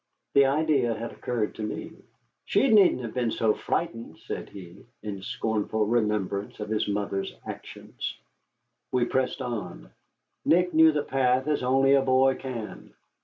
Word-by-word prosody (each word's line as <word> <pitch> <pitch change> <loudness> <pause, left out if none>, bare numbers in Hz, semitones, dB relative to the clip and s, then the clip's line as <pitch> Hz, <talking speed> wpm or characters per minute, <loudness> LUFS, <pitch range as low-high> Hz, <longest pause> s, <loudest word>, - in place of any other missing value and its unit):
The 140 -1 +6
idea 140 -5 +2
had 115 +2 -5
occurred 115 -4 -2
to - - -8
me. 105 - -4 0.5
"She 270 - +2
needn't 200 - +5
have 115 - -5
been 120 -2 0
so 110 -1 +1
frightened," 115 -6 -3
said - - -5
he, 90 -3 -12 0.2
in 100 -3 -5
scornful 110 +2 -1
remembrance 105 -3 -1
of 105 - -5
his 110 -1 0
mother's 100 -1 -2
actions. - - -7 0.7
We 125 -1 +2
pressed 130 +1 -1
on. 90 - -6 0.5
Nick 180 +1 +3
knew 160 0 +7
the 150 -1 -1
path 130 -1 +1
as 150 -1 +1
only 135 +2 +3
a 140 - +5
boy 135 0 +4
can. 125 -5 -7
120 Hz, 150 wpm, -27 LUFS, 105-135 Hz, 0.7 s, knew